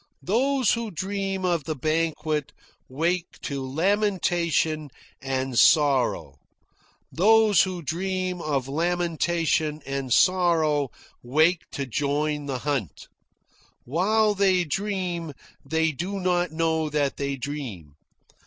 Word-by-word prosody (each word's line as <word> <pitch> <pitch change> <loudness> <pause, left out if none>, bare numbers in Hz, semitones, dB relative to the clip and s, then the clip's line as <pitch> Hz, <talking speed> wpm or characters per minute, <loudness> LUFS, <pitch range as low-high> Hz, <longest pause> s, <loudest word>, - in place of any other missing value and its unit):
Those 255 +4 +2
who 230 -1 -2
dream 195 +1 -3
of 170 -5 0
the 155 - -3
banquet, 155 0 -1 0.4
wake 170 +6 -2
to 140 -3 -3
lamentation 170 -1 0 0.3
and 130 -2 -1
sorrow. 125 - +3 0.7
Those 215 0 +5
who 185 -2 -2
dream 185 +3 -2
of 140 -5 -1
lamentation 165 -1 0
and 135 -1 -4
sorrow, 160 -5 +3 0.3
wake 155 +8 +2
to 140 - -3
join 145 +3 -1
the 135 -2 -2
hunt. 135 - -3 0.8
While 210 - +2
they 190 -2 +3
dream, 175 -2 -3 0.3
they 160 0 +1
do 180 +7 -4
not 180 -2 0
know 160 -1 0
that 145 -2 -1
they 140 -1 -2
dream. 125 - -6
160 Hz, 105 wpm, -25 LUFS, 145-185 Hz, 0.8 s, Those